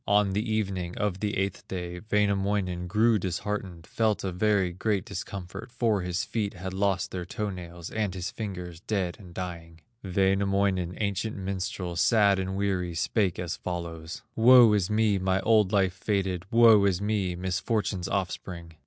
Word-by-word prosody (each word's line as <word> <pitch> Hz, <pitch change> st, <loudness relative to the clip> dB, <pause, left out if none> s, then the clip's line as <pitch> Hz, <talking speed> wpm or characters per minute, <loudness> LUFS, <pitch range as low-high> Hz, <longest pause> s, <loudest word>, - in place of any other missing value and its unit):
On 100 Hz, -1 st, +3 dB
the 110 Hz, +3 st, -1 dB
evening 95 Hz, -5 st, -2 dB
of 100 Hz, -3 st, -1 dB
the 105 Hz, 0 st, -1 dB
eighth 95 Hz, 0 st, -2 dB
day, 90 Hz, -1 st, -5 dB
Wainamoinen 100 Hz, -3 st, +1 dB
grew 110 Hz, +3 st, +3 dB
disheartened, 95 Hz, -1 st, -4 dB
Felt 110 Hz, 0 st, 0 dB
a 95 Hz, -, -1 dB
very 95 Hz, -1 st, +1 dB
great 100 Hz, +1 st, -1 dB
discomfort, 95 Hz, +5 st, -7 dB
For 110 Hz, -5 st, +1 dB
his 90 Hz, +1 st, -2 dB
feet 105 Hz, -1 st, -2 dB
had 95 Hz, +1 st, -6 dB
lost 95 Hz, -1 st, 0 dB
their 90 Hz, -1 st, -4 dB
toe 105 Hz, +3 st, -3 dB
nails, 85 Hz, -2 st, -8 dB
And 105 Hz, -4 st, -1 dB
his 95 Hz, 0 st, -4 dB
fingers 90 Hz, -6 st, -6 dB
dead 95 Hz, -2 st, -2 dB
and 90 Hz, -4 st, -12 dB
dying. 85 Hz, -2 st, -7 dB, 0.2 s
Wainamoinen, 95 Hz, -1 st, +1 dB
ancient 100 Hz, +1 st, -2 dB
minstrel, 95 Hz, -2 st, -3 dB
Sad 100 Hz, +1 st, +4 dB
and 95 Hz, 0 st, -3 dB
weary, 95 Hz, -4 st, -1 dB
spake 90 Hz, +3 st, 0 dB
as 85 Hz, -2 st, -3 dB
follows: 85 Hz, -1 st, -5 dB
"Woe 120 Hz, -1 st, +8 dB
is 100 Hz, -2 st, +1 dB
me, 105 Hz, -2 st, +2 dB
my 95 Hz, 0 st, +1 dB
old 105 Hz, -2 st, +3 dB
life 95 Hz, -3 st, +2 dB
fated! 95 Hz, -2 st, -1 dB
Woe 115 Hz, -3 st, +7 dB
is 95 Hz, -3 st, +2 dB
me, 100 Hz, -3 st, -1 dB
misfortune's 95 Hz, +1 st, -1 dB
offspring! 90 Hz, -3 st, -4 dB
95 Hz, 160 wpm, -27 LUFS, 90-105 Hz, 0.2 s, Woe